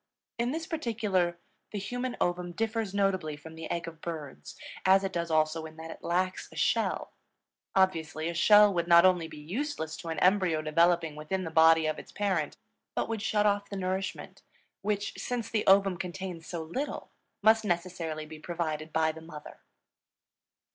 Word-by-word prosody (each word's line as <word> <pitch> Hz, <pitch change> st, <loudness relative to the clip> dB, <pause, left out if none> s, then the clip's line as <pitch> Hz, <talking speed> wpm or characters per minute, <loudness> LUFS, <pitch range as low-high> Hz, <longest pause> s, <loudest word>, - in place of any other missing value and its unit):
In 235 Hz, +1 st, +1 dB
this 320 Hz, +4 st, -3 dB
particular 210 Hz, -, 0 dB, 0.3 s
the 210 Hz, -, -4 dB
human 245 Hz, +5 st, -3 dB
ovum 175 Hz, 0 st, -1 dB
differs 225 Hz, 0 st, -1 dB
notably 190 Hz, -6 st, 0 dB
from 160 Hz, +2 st, -11 dB
the 160 Hz, 0 st, -7 dB
egg 170 Hz, -1 st, -2 dB
of 165 Hz, -1 st, -9 dB
birds, 150 Hz, -, -7 dB, 0.3 s
as 190 Hz, +1 st, +5 dB
it 195 Hz, 0 st, -2 dB
does 170 Hz, -1 st, -2 dB
also 155 Hz, 0 st, +1 dB
in 155 Hz, -, -14 dB
that 160 Hz, 0 st, -7 dB
it -, -, -11 dB
lacks 185 Hz, +2 st, -1 dB
a -, -, -13 dB
shell. -, -, 0 dB, 0.6 s
Obviously, 165 Hz, -4 st, +1 dB
a 170 Hz, -, -2 dB
shell 210 Hz, +4 st, +6 dB
would 170 Hz, -1 st, 0 dB
not 170 Hz, +1 st, +8 dB
only 180 Hz, -3 st, +3 dB
be 160 Hz, -1 st, -11 dB
useless 170 Hz, -, -4 dB
to -, -, -9 dB
an 165 Hz, -, -3 dB
embryo 180 Hz, -4 st, +3 dB
developing 165 Hz, 0 st, +2 dB
within 170 Hz, +5 st, -3 dB
the 165 Hz, -, -5 dB
body 160 Hz, 0 st, +6 dB
of 155 Hz, -1 st, -1 dB
its -, -, -12 dB
parent, 190 Hz, -7 st, -1 dB, 0.4 s
but -, -, 0 dB
would 225 Hz, -2 st, -2 dB
shut 210 Hz, -1 st, +1 dB
off 200 Hz, -1 st, +1 dB
the 200 Hz, -, -5 dB
nourishment, 190 Hz, +1 st, -3 dB, 0.4 s
which, 205 Hz, 0 st, -1 dB
since 245 Hz, -2 st, -3 dB
the 215 Hz, -2 st, 0 dB
ovum 195 Hz, -1 st, +5 dB
contains 180 Hz, -1 st, -6 dB
so 170 Hz, -2 st, -4 dB
little, 255 Hz, -, -4 dB, 0.3 s
must 220 Hz, +1 st, +5 dB
necessarily 170 Hz, -4 st, -2 dB
be 155 Hz, 0 st, -10 dB
provided 155 Hz, -2 st, -3 dB
by 160 Hz, 0 st, +2 dB
the 160 Hz, +1 st, -11 dB
mother. 155 Hz, -2 st, -11 dB
175 Hz, 175 wpm, -29 LUFS, 160-200 Hz, 0.6 s, not